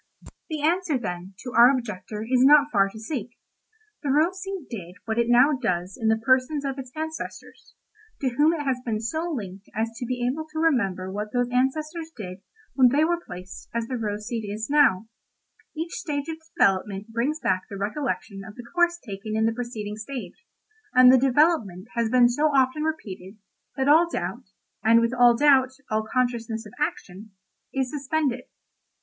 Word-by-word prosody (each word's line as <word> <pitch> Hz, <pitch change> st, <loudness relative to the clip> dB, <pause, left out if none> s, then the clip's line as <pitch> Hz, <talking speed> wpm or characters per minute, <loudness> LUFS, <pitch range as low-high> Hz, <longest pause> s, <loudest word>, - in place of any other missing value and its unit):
"The 310 Hz, -2 st, -4 dB
answer, 340 Hz, -2 st, +1 dB
then, 185 Hz, -4 st, -6 dB
to 250 Hz, -1 st, -6 dB
our 235 Hz, +2 st, +8 dB
objector 215 Hz, -5 st, -3 dB
is 250 Hz, +2 st, +2 dB
not 290 Hz, +1 st, +6 dB
far 195 Hz, -1 st, +3 dB
to 200 Hz, -, -12 dB
seek. 240 Hz, 0 st, -5 dB, 0.6 s
The 290 Hz, -, -3 dB
rose 330 Hz, +7 st, +2 dB
seed 385 Hz, -5 st, -5 dB
did 180 Hz, -6 st, -8 dB
what 225 Hz, 0 st, -1 dB
it 235 Hz, -, +2 dB
now 250 Hz, +5 st, +6 dB
does 185 Hz, -8 st, -2 dB
in 225 Hz, -, -2 dB
the 220 Hz, 0 st, +4 dB
persons 260 Hz, +5 st, +1 dB
of 270 Hz, 0 st, -3 dB
its 255 Hz, -2 st, -8 dB
ancestors—to 320 Hz, +3 st, -7 dB
whom 295 Hz, +6 st, +3 dB
it 325 Hz, -3 st, -2 dB
has 265 Hz, -3 st, 0 dB
been 225 Hz, -3 st, -2 dB
so 315 Hz, +10 st, -2 dB
linked 200 Hz, -, -6 dB
as 225 Hz, +1 st, -1 dB
to 245 Hz, -, -5 dB
be 245 Hz, -1 st, -2 dB
able 310 Hz, +5 st, -3 dB
to 315 Hz, -, -4 dB
remember 195 Hz, -, +1 dB
what 210 Hz, +2 st, -4 dB
those 245 Hz, -1 st, +1 dB
ancestors 305 Hz, +6 st, -1 dB
did 185 Hz, -3 st, -7 dB, 0.3 s
when 255 Hz, -2 st, +5 dB
they 285 Hz, +5 st, +3 dB
were 345 Hz, +1 st, 0 dB
placed 180 Hz, +1 st, -10 dB
as 230 Hz, -1 st, 0 dB
the 255 Hz, -, -4 dB
rose 210 Hz, -2 st, -3 dB
seed 230 Hz, -1 st, -3 dB, 0.3 s
now 285 Hz, -11 st, +5 dB, 0.7 s
is. 315 Hz, -, -1 dB
Each 340 Hz, -, -16 dB
stage 285 Hz, -2 st, -3 dB
of 320 Hz, -, -4 dB, 0.2 s
development 195 Hz, +2 st, +1 dB
brings 245 Hz, +8 st, -1 dB
back 185 Hz, -7 st, -1 dB
the 200 Hz, -, -6 dB
recollection 210 Hz, -1 st, -3 dB
of 205 Hz, +1 st, -11 dB
the 245 Hz, -, -10 dB
course 345 Hz, 0 st, +3 dB
taken 215 Hz, -, -6 dB
in 220 Hz, -, +2 dB
the 225 Hz, -, +1 dB
preceding 225 Hz, -3 st, -5 dB
stage, 225 Hz, -, -8 dB, 0.5 s
and 255 Hz, 0 st, +9 dB
the 260 Hz, -, +6 dB
development 240 Hz, -, +2 dB
has 235 Hz, -2 st, 0 dB
been 245 Hz, 0 st, +6 dB
so 250 Hz, +6 st, 0 dB
often 275 Hz, 0 st, +2 dB
repeated, 215 Hz, -, -5 dB, 0.4 s
that 265 Hz, 0 st, 0 dB
all 325 Hz, +4 st, +6 dB
doubt—and 230 Hz, -7 st, -1 dB
with 230 Hz, +1 st, +1 dB
all 245 Hz, -2 st, +5 dB
doubt, 265 Hz, -2 st, +4 dB, 0.2 s
all 215 Hz, 0 st, 0 dB
consciousness 235 Hz, -3 st, -1 dB
of 210 Hz, -, -12 dB
action—is 225 Hz, -, -5 dB
suspended. 285 Hz, -2 st, -1 dB
245 Hz, 180 wpm, -25 LUFS, 215-295 Hz, 0.7 s, and